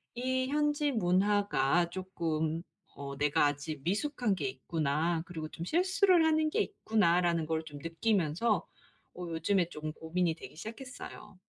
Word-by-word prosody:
이 260 Hz, +1 st, 0 dB
현지 295 Hz, 0 st, +1 dB
문화가 185 Hz, -, +2 dB
쪼끔 165 Hz, -3 st, -2 dB, 0.3 s
어 140 Hz, 0 st, -6 dB
'내가 145 Hz, 0 st, +3 dB
아직 145 Hz, 0 st, -4 dB
미숙한 215 Hz, -, 0 dB
게 145 Hz, -6 st, -2 dB
있구나. 155 Hz, +4 st, -1 dB
그리고 160 Hz, -3 st, -6 dB
좀 170 Hz, -, -6 dB
실수를 365 Hz, -, +4 dB
하는 310 Hz, -1 st, +3 dB
게 440 Hz, -, +2 dB
있구나.'라는 175 Hz, -, +2 dB
걸 160 Hz, 0 st, -1 dB
좀 145 Hz, -2 st, -9 dB
느끼면서 180 Hz, +2 st, +1 dB, 0.5 s
어 180 Hz, -1 st, -6 dB
요즘에 170 Hz, +2 st, +1 dB
좀 155 Hz, -1 st, -5 dB
고민이 165 Hz, +1 st, 0 dB
되기 160 Hz, -, -11 dB
시작했어요. 220 Hz, -, -9 dB
175 Hz, 290 characters per minute, -31 LUFS, 160-225 Hz, 0.5 s, 실수를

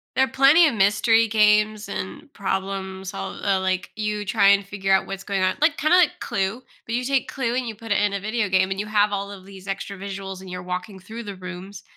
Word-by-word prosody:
there 265 Hz, -, +4 dB
are -, -, -8 dB
plenty 275 Hz, +6 st, +6 dB
of 280 Hz, -, 0 dB
mystery 225 Hz, +3 st, +4 dB
games 210 Hz, -1 st, +3 dB
and 200 Hz, +9 st, -6 dB
problems, 190 Hz, -1 st, -4 dB
all -, -, -6 dB
all, 195 Hz, -2 st, +2 dB
like, 185 Hz, -1 st, -1 dB
you 210 Hz, -1 st, -2 dB
try 200 Hz, -1 st, +3 dB
and 200 Hz, 0 st, +4 dB
figure 195 Hz, -1 st, -1 dB
out 190 Hz, -, +3 dB
what's 195 Hz, 0 st, -6 dB
going 195 Hz, -2 st, -1 dB
on, 185 Hz, -, +1 dB
like 305 Hz, -1 st, +3 dB
kinda 310 Hz, +5 st, +4 dB
like 350 Hz, -4 st, +3 dB
Clue, 195 Hz, +6 st, -2 dB, 0.2 s
but 230 Hz, -, -3 dB
you 250 Hz, -, -1 dB
take 270 Hz, 0 st, 0 dB
Clue 245 Hz, -3 st, -2 dB
and 255 Hz, -2 st, -1 dB
you 220 Hz, -, -5 dB
put 225 Hz, 0 st, -9 dB
it -, -, +3 dB
in 205 Hz, -1 st, +1 dB
a 200 Hz, -, -1 dB
video 215 Hz, +1 st, -1 dB
game 190 Hz, 0 st, +2 dB
and 195 Hz, -, -2 dB
you 210 Hz, -, -2 dB
have 210 Hz, -1 st, +2 dB
all 200 Hz, 0 st, -3 dB
of 190 Hz, -2 st, -11 dB
these 195 Hz, 0 st, -13 dB
extra 195 Hz, 0 st, -4 dB
visuals 195 Hz, -1 st, -6 dB
and 190 Hz, -, -10 dB
you're 180 Hz, 0 st, -6 dB
walking 180 Hz, +2 st, -5 dB
through 225 Hz, +5 st, -8 dB
the 200 Hz, -2 st, -7 dB
rooms, 185 Hz, +1 st, -9 dB
200 Hz, 245 wpm, -23 LUFS, 190-220 Hz, 0.2 s, plenty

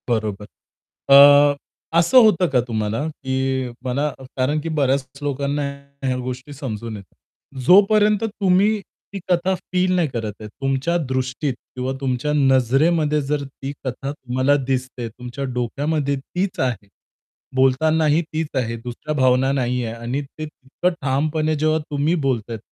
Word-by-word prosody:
बरोबर. 110 Hz, -3 st, -1 dB, 0.7 s
अ, -, -, +11 dB, 0.8 s
असं 170 Hz, +10 st, +4 dB
होतं 190 Hz, -5 st, +4 dB
का 130 Hz, -2 st, +2 dB
तुम्हाला? 110 Hz, +4 st, -2 dB
की 130 Hz, -3 st, -2 dB, 0.2 s
मला 140 Hz, +4 st, 0 dB, 0.3 s
कारण, 140 Hz, +4 st, +1 dB
की 165 Hz, -, -4 dB
बऱ्याच 135 Hz, -1 st, +1 dB
लोकांना 145 Hz, 0 st, -1 dB, 0.4 s
ह्या 130 Hz, -1 st, 0 dB
गोष्टी 130 Hz, +3 st, -6 dB
समजून 115 Hz, -5 st, -5 dB
येतात. 100 Hz, -4 st, -15 dB, 0.5 s
जोपर्यंत 205 Hz, +3 st, +5 dB
तुम्ही 205 Hz, 0 st, +2 dB, 0.3 s
ती 200 Hz, -, -4 dB
कथा 180 Hz, +1 st, +2 dB
फील 185 Hz, 0 st, -1 dB
नाही 175 Hz, -3 st, +2 dB
करत 110 Hz, -5 st, -4 dB
आहे, 105 Hz, -, -7 dB
तुमच्या 135 Hz, +8 st, -1 dB
दृष्टीत 130 Hz, +2 st, -1 dB, 0.2 s
किंवा 130 Hz, +1 st, -2 dB
तुमच्या 130 Hz, +2 st, -1 dB
नजरेमध्ये 145 Hz, +3 st, +3 dB
जर 145 Hz, +1 st, -2 dB
ती 135 Hz, 0 st, -7 dB
कथा 135 Hz, +2 st, -4 dB
तुम्हाला 130 Hz, 0 st, 0 dB
दिसते, 130 Hz, -2 st, -2 dB
तुमच्या 125 Hz, +4 st, -7 dB
डोक्यामध्ये 140 Hz, +4 st, -1 dB
तीच 180 Hz, +8 st, -4 dB
आहे. 120 Hz, -6 st, -1 dB, 0.7 s
बोलतानाही 150 Hz, +4 st, +3 dB
तीच 160 Hz, 0 st, -1 dB
आहे, 115 Hz, -2 st, -1 dB
दुसऱ्या 125 Hz, +5 st, -5 dB
भावना 130 Hz, 0 st, +3 dB
नाही 125 Hz, -2 st, 0 dB
आहे 115 Hz, -1 st, -4 dB
आणि 120 Hz, +4 st, -3 dB
ते 145 Hz, +2 st, -9 dB
इतकं 155 Hz, +4 st, -3 dB
ठामपणे 155 Hz, +3 st, 0 dB
जेव्हा 155 Hz, +1 st, +1 dB
तुम्ही 145 Hz, +4 st, +1 dB
बोलतात. 115 Hz, -3 st, -2 dB
135 Hz, 135 wpm, -21 LUFS, 125-155 Hz, 0.8 s, अ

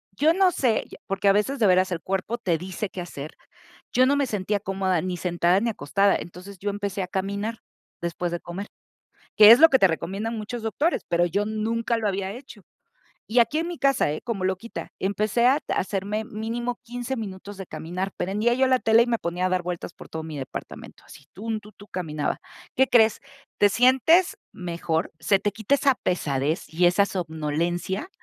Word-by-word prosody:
Yo, 310 Hz, +7 st, +4 dB
no 375 Hz, -1 st, +4 dB
sé, 245 Hz, -8 st, +1 dB, 0.2 s
porque, 195 Hz, +1 st, -1 dB
a -, -, +8 dB
veces, 210 Hz, +7 st, +1 dB
de 225 Hz, -, +2 dB
veras, 185 Hz, 0 st, +3 dB
el 170 Hz, -2 st, -2 dB
cuerpo 195 Hz, +5 st, -2 dB
te 180 Hz, -8 st, 0 dB
dice 190 Hz, +3 st, -4 dB
qué 180 Hz, -, -6 dB
hacer. 155 Hz, -4 st, -7 dB, 0.6 s
Yo 255 Hz, -, +5 dB
no 285 Hz, -, +3 dB
me 285 Hz, -, +2 dB
sentía 205 Hz, -3 st, -1 dB
cómoda, 190 Hz, -2 st, 0 dB
ni 180 Hz, -1 st, -3 dB
sentada, 175 Hz, +1 st, +2 dB
ni 235 Hz, -, 0 dB
acostada, 200 Hz, +1 st, +2 dB
entonces, 185 Hz, +3 st, -8 dB
yo 205 Hz, +3 st, -2 dB
empecé 200 Hz, -1 st, -3 dB
a -, -, -5 dB
caminar, 200 Hz, +4 st, -3 dB, 0.4 s
después 170 Hz, 0 st, -3 dB
de 175 Hz, -, -2 dB
comer, 190 Hz, +5 st, -7 dB, 0.7 s
que 210 Hz, 0 st, +10 dB
es 240 Hz, -, +9 dB
lo 325 Hz, -, +9 dB
que 265 Hz, -, +4 dB
te 195 Hz, -, +6 dB
recomiendan 195 Hz, +7 st, -3 dB
muchos 225 Hz, +3 st, -5 dB
doctores, 285 Hz, +10 st, 0 dB
pero, 175 Hz, 0 st, +3 dB
yo 200 Hz, +4 st, 0 dB
nunca 225 Hz, +2 st, -1 dB
lo 220 Hz, -2 st, -1 dB
había 195 Hz, -1 st, -2 dB
hecho. 245 Hz, -2 st, -11 dB, 0.7 s
Y 240 Hz, +3 st, +2 dB
aquí 240 Hz, +7 st, +3 dB
en 335 Hz, -, -2 dB
mi 350 Hz, -, -5 dB
casa, 275 Hz, -, +2 dB
¿eh? 155 Hz, -, -4 dB
Como 225 Hz, -6 st, -3 dB
loquita, 190 Hz, +5 st, -3 dB
empecé 210 Hz, +4 st, +1 dB
a 275 Hz, +4 st, +4 dB
hacerme, 205 Hz, +3 st, -1 dB
mínimo 230 Hz, +3 st, -4 dB
15 245 Hz, +2 st, -4 dB
minutos 205 Hz, -2 st, -7 dB
de 195 Hz, -1 st, -7 dB
caminar, 185 Hz, +4 st, -4 dB
prendía 210 Hz, +6 st, +1 dB
yo 265 Hz, +1 st, +3 dB
la 255 Hz, -1 st, +3 dB
tele, 225 Hz, 0 st, +5 dB
y -, -, -6 dB
me 230 Hz, -2 st, 0 dB
ponía 175 Hz, +2 st, -2 dB
a -, -, +1 dB
dar 185 Hz, 0 st, +1 dB
vueltas 175 Hz, -1 st, -5 dB
por -, -, -13 dB
todo 160 Hz, 0 st, -5 dB
mi 155 Hz, -2 st, -7 dB
departamento, 130 Hz, -, -8 dB
así, 140 Hz, -, -15 dB
tun, 220 Hz, +3 st, -4 dB
tun, 210 Hz, +1 st, -15 dB
tu, 205 Hz, -, -14 dB
caminaba. 155 Hz, -5 st, -3 dB, 0.4 s
¿Qué 265 Hz, 0 st, +4 dB
crees? 220 Hz, -3 st, +4 dB, 0.4 s
Te 205 Hz, -, +6 dB
sientes 265 Hz, -, +4 dB, 0.2 s
mejor, 170 Hz, -2 st, -3 dB
se 195 Hz, -, +3 dB
te 205 Hz, -, -1 dB
quita 220 Hz, +5 st, +1 dB
esa 275 Hz, -2 st, +3 dB
pesadez 150 Hz, -3 st, -1 dB
y 175 Hz, +2 st, +3 dB
esa 190 Hz, +3 st, +4 dB
somnolencia, 175 Hz, -, -2 dB
200 Hz, 200 wpm, -25 LUFS, 180-230 Hz, 0.7 s, que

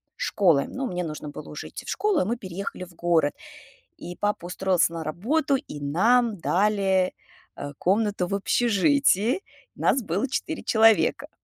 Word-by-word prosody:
школы, 165 Hz, -8 st, +2 dB
но 265 Hz, +1 st, -4 dB
мне 180 Hz, -6 st, -3 dB
нужно 155 Hz, -2 st, -6 dB
было 145 Hz, -, -9 dB
уже -, -, -7 dB
идти -, -, -9 dB
в -, -, -8 dB
школу, 415 Hz, -5 st, +1 dB
и -, -, 0 dB
мы 230 Hz, +5 st, -1 dB
переехали 190 Hz, -2 st, -6 dB
в 180 Hz, -, -12 dB
город, 165 Hz, -3 st, +2 dB, 0.6 s
и 175 Hz, +1 st, -8 dB
папа 205 Hz, -4 st, -2 dB
устроился 180 Hz, -2 st, +1 dB
на 165 Hz, -1 st, -5 dB
работу, 265 Hz, -, 0 dB
и 150 Hz, -, -8 dB
нам 220 Hz, +10 st, +2 dB
дали, 190 Hz, 0 st, +1 dB, 0.4 s
а, 145 Hz, 0 st, -7 dB
комнату 200 Hz, -1 st, +1 dB
в 195 Hz, -, -3 dB
общежитии, 240 Hz, -, +2 dB, 0.3 s
нас 265 Hz, -, +2 dB
было 200 Hz, +7 st, -1 dB
4 315 Hz, +4 st, -3 dB
человека. 225 Hz, -1 st, +3 dB
195 Hz, 155 wpm, -25 LUFS, 175-235 Hz, 0.6 s, человека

